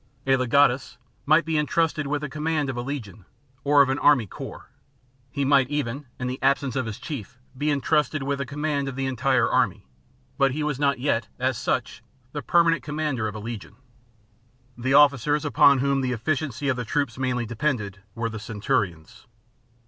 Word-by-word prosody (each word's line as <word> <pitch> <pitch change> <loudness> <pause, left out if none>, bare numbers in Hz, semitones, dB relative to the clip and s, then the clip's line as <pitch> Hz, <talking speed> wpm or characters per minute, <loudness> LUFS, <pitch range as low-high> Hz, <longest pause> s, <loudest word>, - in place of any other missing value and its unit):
A 135 0 +4
legatus 130 0 +2 0.3
might 155 +3 +5
be 160 -2 +1
en 150 - 0
trusted 160 -3 0
with 145 0 -1
the 150 - -3
command 150 -1 -1
of - - -8
a 120 - -3
legion 120 -7 -6 0.4
or 145 0 +6
of 135 - -2
an 135 +2 0
army 140 -6 +4
corps; - - -9 0.6
he 140 +3 -2
might 135 -2 +4
even, 145 -1 -3
in 125 - -4
the 125 +1 -4
absence 135 -1 +1
of 130 -3 -1
his 105 - -5
chief, 125 - -7 0.2
be 145 +3 -1
entrusted 150 0 +1
with 140 0 -2
the 140 - -2
command 145 0 -2
of 135 - -5
the 135 0 -2
entire 130 -1 +2
army. - - +1 0.5
But 135 -1 +3
he 150 +2 -2
was 150 -3 -2
not 140 -2 +2
yet, 120 -5 0
as 130 +1 0
such, - - -2 0.3
the 145 - -4
per 170 +6 +4
manent 165 0 +2
commander 150 -6 -2
of 105 - -6
a - - -5
legion. 115 -1 -7 1.0
The 130 +3 0
officers 145 +1 +4
upon 140 0 +5
whom 135 +1 +1
the 125 -1 -1
efficiency 140 +2 -2
of 130 -3 +1
the 125 - -2
troops 130 0 -2
mainly 125 -2 -1
depended 110 -5 -2 0.2
were 115 0 -1
the 110 - -6
centurions. 100 -6 -3
135 Hz, 190 wpm, -25 LUFS, 120-145 Hz, 1.0 s, or